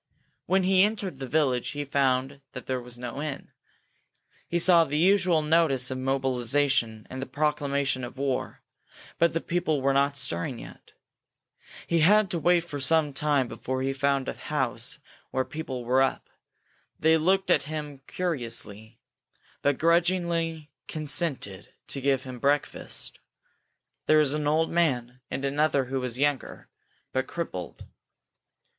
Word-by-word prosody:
When 190 Hz, 0 st, +3 dB
he 185 Hz, 0 st, +4 dB
entered 200 Hz, -7 st, 0 dB
the 135 Hz, -, -5 dB
village 130 Hz, -4 st, +1 dB
he 145 Hz, -, -2 dB
found 135 Hz, 0 st, 0 dB
that 125 Hz, -, -8 dB
there 130 Hz, -1 st, -2 dB
was 120 Hz, 0 st, -10 dB
no 125 Hz, +3 st, -5 dB
inn. 150 Hz, -3 st, -5 dB, 1.0 s
He 170 Hz, -, 0 dB
saw 170 Hz, -1 st, +6 dB
the 150 Hz, -1 st, -2 dB
usual 180 Hz, -2 st, +4 dB
notice 150 Hz, -5 st, +2 dB
of 130 Hz, -, -3 dB
mobilization 130 Hz, -3 st, +1 dB
and 130 Hz, +1 st, -5 dB
the 135 Hz, -, -4 dB
proclamation 140 Hz, -2 st, 0 dB
of 120 Hz, +2 st, -7 dB
war, 135 Hz, -2 st, -2 dB, 0.6 s
but 170 Hz, -1 st, +3 dB
the 165 Hz, -, -1 dB
people 170 Hz, -4 st, 0 dB
were 135 Hz, +1 st, +2 dB
not 140 Hz, +1 st, +2 dB
stirring 125 Hz, -1 st, -1 dB
yet. -, -, -12 dB, 0.9 s
He 170 Hz, -, +1 dB
had 200 Hz, +4 st, +5 dB
to 170 Hz, -, 0 dB
wait 175 Hz, +1 st, +4 dB
for 155 Hz, -4 st, -7 dB
some 150 Hz, +1 st, +3 dB
time 145 Hz, -3 st, +1 dB
before 130 Hz, +3 st, -4 dB
he 135 Hz, 0 st, 0 dB
found 140 Hz, 0 st, 0 dB
a -, -, -2 dB
house 130 Hz, -1 st, -2 dB, 0.3 s
where 130 Hz, 0 st, -1 dB
people 130 Hz, -6 st, -6 dB
were 130 Hz, +2 st, +3 dB
up. 135 Hz, -, -1 dB, 0.7 s
They 160 Hz, +1 st, +5 dB
looked 190 Hz, +4 st, +2 dB
at -, -, +3 dB
him 150 Hz, -3 st, -5 dB
curiously, 115 Hz, -, -4 dB, 0.6 s
but 145 Hz, -1 st, +2 dB
grudgingly 170 Hz, -2 st, +1 dB, 0.2 s
consented 145 Hz, -, -2 dB
to 135 Hz, -, -3 dB
give 135 Hz, -1 st, +1 dB
him 130 Hz, -2 st, -8 dB
breakfast. 145 Hz, +3 st, -1 dB, 0.9 s
There 155 Hz, -, +6 dB
was 150 Hz, -2 st, +3 dB
an 150 Hz, -1 st, -1 dB
old 160 Hz, +2 st, +2 dB
man, 125 Hz, -7 st, 0 dB
and 135 Hz, +1 st, -3 dB
another 140 Hz, -1 st, +1 dB
who 135 Hz, +1 st, -2 dB
was 125 Hz, -2 st, -2 dB
younger, 145 Hz, -1 st, -1 dB, 0.4 s
but 130 Hz, 0 st, -1 dB
crippled. 160 Hz, -, -6 dB
140 Hz, 150 wpm, -27 LUFS, 130-160 Hz, 1.0 s, saw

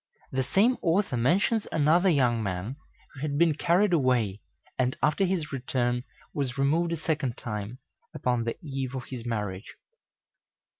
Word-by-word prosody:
The 130 Hz, -, 0 dB
same 200 Hz, -, +3 dB
author 175 Hz, -3 st, +1 dB
mentions 190 Hz, -, +2 dB
another 165 Hz, +5 st, +4 dB
young 125 Hz, -7 st, +3 dB
man 100 Hz, +4 st, -3 dB, 0.4 s
who 135 Hz, -, -11 dB
had 145 Hz, -1 st, -1 dB
been 165 Hz, 0 st, +4 dB
carried 175 Hz, +6 st, +2 dB
away, 125 Hz, -, +2 dB, 0.4 s
and 130 Hz, 0 st, +1 dB
after 150 Hz, +7 st, +3 dB
his 180 Hz, -5 st, -1 dB
return 125 Hz, -1 st, -1 dB, 0.3 s
was 135 Hz, -3 st, -2 dB
removed 160 Hz, +5 st, +2 dB
a 170 Hz, -, -1 dB
second 150 Hz, -6 st, -1 dB
time, 105 Hz, +1 st, -5 dB, 0.3 s
upon 125 Hz, -2 st, 0 dB
the 115 Hz, -, -2 dB
eve 135 Hz, -2 st, -3 dB
of 130 Hz, -, -4 dB
his 120 Hz, -2 st, -6 dB
marriage. 105 Hz, -3 st, -4 dB
135 Hz, 150 wpm, -28 LUFS, 120-165 Hz, 0.4 s, another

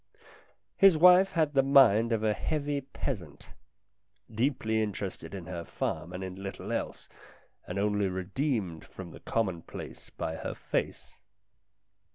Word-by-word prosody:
His 195 Hz, -4 st, +7 dB
wife 180 Hz, +3 st, +7 dB
had 155 Hz, -3 st, +1 dB
the 135 Hz, -, +5 dB
mind 125 Hz, -5 st, +5 dB
of 110 Hz, -1 st, 0 dB
a 110 Hz, -1 st, +3 dB
heavy 145 Hz, +2 st, -2 dB
peasant, 110 Hz, -, -6 dB, 0.8 s
deeply 110 Hz, -2 st, 0 dB
interested 100 Hz, -4 st, -4 dB
in 90 Hz, -3 st, -7 dB
her 85 Hz, -1 st, -5 dB
farm 85 Hz, -, -3 dB
and 90 Hz, +1 st, -5 dB
in 95 Hz, +1 st, -7 dB
little 95 Hz, 0 st, -6 dB
else, -, -, -3 dB, 0.6 s
and 90 Hz, -, -4 dB
only 105 Hz, 0 st, +1 dB
redeemed 95 Hz, -, -2 dB
from 90 Hz, -3 st, -10 dB
the -, -, -11 dB
commonplace 95 Hz, -7 st, -4 dB
by 80 Hz, -, -4 dB
her -, -, -5 dB
face. -, -, -4 dB
105 Hz, 135 wpm, -29 LUFS, 95-140 Hz, 0.8 s, His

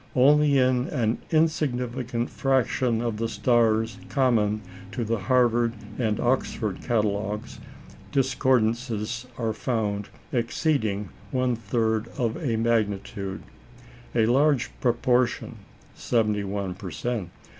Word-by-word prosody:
Only 145 Hz, +2 st, +5 dB
in 130 Hz, -1 st, +3 dB
an 115 Hz, -4 st, 0 dB
insignificant 125 Hz, -6 st, 0 dB
fraction 130 Hz, -3 st, +1 dB
of 115 Hz, -3 st, -2 dB
the 115 Hz, +1 st, -1 dB
stars 110 Hz, 0 st, +2 dB
common 110 Hz, -6 st, +2 dB, 0.3 s
to 120 Hz, -, -2 dB
the 115 Hz, 0 st, 0 dB
Harvard 120 Hz, +2 st, +2 dB, 0.3 s
and 110 Hz, -3 st, 0 dB
Oxford 120 Hz, -5 st, 0 dB
catalogues 105 Hz, -2 st, -1 dB, 0.5 s
discordances 120 Hz, -3 st, +1 dB
are 115 Hz, -2 st, -1 dB
found 105 Hz, -4 st, -2 dB, 0.2 s
exceeding 115 Hz, -, 0 dB, 0.2 s
one 125 Hz, -1 st, +1 dB
third 110 Hz, 0 st, 0 dB
of 115 Hz, -4 st, 0 dB
a 120 Hz, -6 st, +1 dB
magnitude; 105 Hz, -4 st, -1 dB, 0.7 s
a 115 Hz, -2 st, +4 dB
large 135 Hz, +1 st, +3 dB
proportion 120 Hz, 0 st, +1 dB, 0.4 s
(71 105 Hz, -4 st, -1 dB
per 95 Hz, +1 st, -8 dB
cent.) 110 Hz, 0 st, -3 dB
115 Hz, 100 wpm, -26 LUFS, 110-125 Hz, 0.7 s, Only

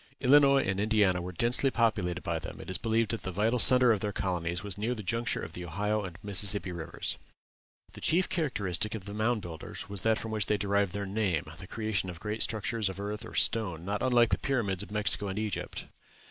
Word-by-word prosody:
Illinois 140 Hz, +1 st, +5 dB
and 95 Hz, 0 st, -1 dB
Indiana 105 Hz, -4 st, +2 dB
were 90 Hz, +1 st, -5 dB
densely 120 Hz, +8 st, +1 dB
populated 110 Hz, -8 st, 0 dB
by 85 Hz, -1 st, -2 dB
them: 80 Hz, -, -8 dB
it -, -, -7 dB
is 90 Hz, -, 0 dB
believed 115 Hz, -2 st, +1 dB
that 115 Hz, -, -2 dB
the 95 Hz, -, -4 dB
vital 110 Hz, +6 st, +1 dB
centre 125 Hz, 0 st, +7 dB
of 105 Hz, -, -1 dB
their 105 Hz, +1 st, -2 dB
colonies 90 Hz, -3 st, -2 dB
was 100 Hz, -3 st, -3 dB
near 115 Hz, +4 st, -2 dB
the 105 Hz, -, -7 dB
junction 115 Hz, +4 st, -1 dB
of -, -, -7 dB
the 90 Hz, -, -7 dB
Ohio 105 Hz, +5 st, -1 dB
and 90 Hz, -3 st, -7 dB
Mississippi 100 Hz, -1 st, +4 dB
rivers. 85 Hz, -2 st, -4 dB, 0.8 s
The -, -, -11 dB
chief 180 Hz, +3 st, +3 dB
characteristic 105 Hz, -, -1 dB
of 100 Hz, -4 st, -7 dB
the 100 Hz, -, -7 dB
Mound 110 Hz, 0 st, 0 dB
Builders 80 Hz, -2 st, -7 dB
was 100 Hz, -2 st, -3 dB
that 110 Hz, +2 st, +2 dB
from 110 Hz, -, -6 dB
which 110 Hz, -2 st, 0 dB
they 105 Hz, -, +2 dB
derived 100 Hz, -1 st, 0 dB
their 100 Hz, 0 st, -3 dB
name 95 Hz, -5 st, 0 dB, 0.2 s
the 95 Hz, -, -9 dB
creation 110 Hz, -3 st, -1 dB
of 85 Hz, -2 st, -8 dB
great 105 Hz, +3 st, -4 dB
structures 110 Hz, -2 st, 0 dB
of 95 Hz, -, -7 dB
earth 105 Hz, +1 st, -4 dB
or -, -, -10 dB
stone, 90 Hz, -7 st, +1 dB
not 100 Hz, +1 st, -2 dB
unlike 120 Hz, -3 st, +4 dB
the -, -, +1 dB
pyramids 105 Hz, -9 st, -1 dB
of 105 Hz, -, -6 dB
Mexico 105 Hz, -1 st, +1 dB
and 95 Hz, 0 st, -4 dB
Egypt. 105 Hz, -2 st, -3 dB
105 Hz, 220 wpm, -29 LUFS, 95-115 Hz, 0.8 s, centre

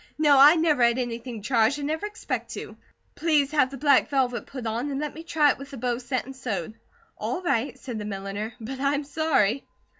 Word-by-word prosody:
"No. 295 Hz, -3 st, +5 dB
I 290 Hz, +4 st, +9 dB
never 315 Hz, -5 st, +2 dB
had 235 Hz, +1 st, +4 dB
anything 235 Hz, -2 st, -4 dB
charged, 230 Hz, +2 st, +2 dB
and 290 Hz, -, -4 dB
never 315 Hz, +7 st, -2 dB
expect 420 Hz, -, -4 dB
to. -, -, -7 dB, 0.4 s
Please 300 Hz, -4 st, +1 dB
have 290 Hz, -4 st, +3 dB
the 275 Hz, -, -8 dB
black 280 Hz, 0 st, +4 dB
velvet 260 Hz, -4 st, 0 dB
put 260 Hz, -4 st, -7 dB
on 230 Hz, +5 st, -2 dB
and 275 Hz, -1 st, -3 dB
let 300 Hz, -1 st, -3 dB
me 320 Hz, -, -8 dB
try 315 Hz, -3 st, +3 dB
it -, -, -6 dB
with 275 Hz, 0 st, -9 dB
the 275 Hz, -, -9 dB
bows 245 Hz, +1 st, -2 dB
set 255 Hz, 0 st, -2 dB
and 270 Hz, +1 st, -9 dB
sewed." 215 Hz, -8 st, -4 dB, 0.5 s
"All 370 Hz, 0 st, -3 dB
right," 265 Hz, -6 st, 0 dB
said 240 Hz, -5 st, -6 dB
the 210 Hz, -, -5 dB
milliner, 200 Hz, +2 st, -5 dB
"but 255 Hz, +4 st, -6 dB
I'm 280 Hz, +1 st, +1 dB
sorry." 280 Hz, -6 st, +1 dB
270 Hz, 215 wpm, -26 LUFS, 235-295 Hz, 0.5 s, I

